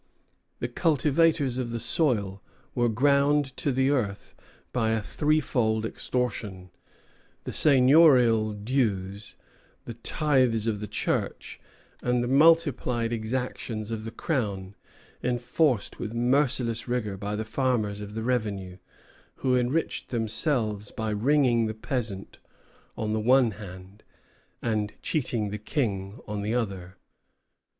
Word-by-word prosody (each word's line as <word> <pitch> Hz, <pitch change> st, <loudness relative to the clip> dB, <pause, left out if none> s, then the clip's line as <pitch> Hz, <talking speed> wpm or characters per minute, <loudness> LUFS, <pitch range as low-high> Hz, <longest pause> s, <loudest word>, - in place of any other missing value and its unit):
The 120 Hz, -, -3 dB
cultivators 150 Hz, -1 st, +2 dB
of 125 Hz, -2 st, -2 dB
the 115 Hz, 0 st, -3 dB
soil 105 Hz, -, 0 dB, 0.3 s
were 120 Hz, -1 st, +2 dB
ground 140 Hz, +3 st, +2 dB
to 145 Hz, -, 0 dB
the 130 Hz, +2 st, +2 dB
earth 105 Hz, -8 st, -2 dB, 0.4 s
by 115 Hz, -3 st, +1 dB
a 110 Hz, -1 st, 0 dB
threefold 125 Hz, -7 st, +1 dB
extortion, 105 Hz, -7 st, -3 dB, 0.7 s
the -, -, -6 dB
seigniorial 130 Hz, -6 st, +5 dB
dues, 105 Hz, -3 st, -2 dB, 0.5 s
the 120 Hz, -, -6 dB
tithes 125 Hz, -2 st, +1 dB
of 110 Hz, -3 st, -1 dB
the 105 Hz, -, -5 dB
Church, -, -, -3 dB, 0.4 s
and 125 Hz, 0 st, +1 dB
the -, -, -2 dB
multiplied 135 Hz, -5 st, +3 dB
exactions 115 Hz, -1 st, -3 dB
of 110 Hz, -1 st, -4 dB
the 115 Hz, -, -5 dB
Crown, 100 Hz, -, -3 dB, 0.5 s
enforced 125 Hz, 0 st, 0 dB
with 115 Hz, +1 st, -5 dB
merciless 120 Hz, -2 st, +1 dB
rigor 120 Hz, -5 st, -2 dB
by 100 Hz, +2 st, -4 dB
the 110 Hz, +1 st, -3 dB
farmers 110 Hz, -4 st, -1 dB
of 105 Hz, +1 st, -8 dB
the 110 Hz, -, -3 dB
revenue, 105 Hz, -7 st, -2 dB, 0.6 s
who 130 Hz, -1 st, +1 dB
enriched 125 Hz, +6 st, -1 dB
themselves 110 Hz, -2 st, -1 dB
by 110 Hz, -1 st, -3 dB
wringing 120 Hz, 0 st, +2 dB
the 110 Hz, -, -4 dB
peasant 110 Hz, -5 st, -4 dB, 0.6 s
on 110 Hz, -1 st, -2 dB
the 110 Hz, -, 0 dB
one 125 Hz, +1 st, +4 dB
hand, 95 Hz, 0 st, -11 dB, 0.6 s
and 105 Hz, -2 st, -1 dB
cheating 120 Hz, -8 st, -1 dB
the 105 Hz, -, -4 dB
King 105 Hz, -4 st, -2 dB
on 105 Hz, -1 st, -3 dB
the 105 Hz, +3 st, -1 dB
other. 95 Hz, -5 st, -3 dB
115 Hz, 125 wpm, -27 LUFS, 105-130 Hz, 0.7 s, seigniorial